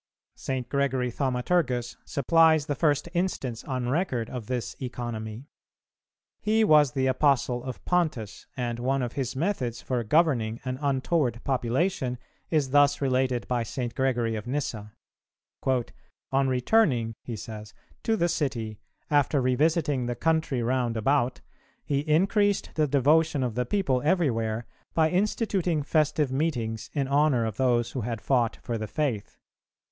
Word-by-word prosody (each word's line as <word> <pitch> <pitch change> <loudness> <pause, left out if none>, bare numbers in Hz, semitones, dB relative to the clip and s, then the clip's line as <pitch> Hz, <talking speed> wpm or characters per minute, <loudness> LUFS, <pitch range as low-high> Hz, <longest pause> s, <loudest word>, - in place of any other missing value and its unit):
St. 130 -2 -4
Gregory 130 -3 0
Thaumaturgus 125 -1 0
supplies 160 +2 +4
the 145 - -1
first 145 0 +1
instance 140 -10 -2
on 130 -3 -2
record 130 - -1
of 120 -5 -6
this 125 -2 -3
economy. 120 -2 -5 0.9
He 220 +1 +2
was 150 - +5
the 130 -1 0
Apostle 130 -2 +2
of 130 -2 -7
Pontus, 150 - -1
and 120 -2 -2
one 130 +2 0
of 120 - -4
his 130 -3 -3
methods 135 - -1
for 125 -2 -2
governing 120 -4 +2
an 130 0 -3
untoward 135 -3 0
population 130 +2 0 0.3
is 145 -5 +1
thus 145 0 +4
related 130 -2 0
by 125 -1 0
St. 120 +1 -4
Gregory 120 -4 0
of 110 +2 -6
Nyssa. 120 -6 -3 0.8
"On 135 +1 -2
returning," 125 - +2
he 120 - -5
says, 105 -1 -8 0.3
"to 225 -1 +1
the 170 - +2
city, 120 -10 -2 0.3
after 145 0 +3
revisiting 140 0 +1
the 120 - -2
country 160 -4 0
round 120 -1 0
about, 125 +2 +1 0.4
he 140 -1 0
increased 195 +7 +2
the 155 -1 +1
devotion 145 +1 +3
of 125 -3 -1
the 125 +1 -1
people 135 -10 +1
everywhere 120 -9 0 0.3
by 160 -1 +3
instituting 185 -4 0
festive 150 -2 +1
meetings 120 -7 -2
in 140 -3 0
honour 140 -4 +3
of 110 -2 -4
those 120 -3 +2
who 130 - -3
had 115 0 -3
fought 120 +1 +1
for 115 -2 -3
the 110 - -4
faith. 125 -9 -2
130 Hz, 140 wpm, -27 LUFS, 120-150 Hz, 0.9 s, was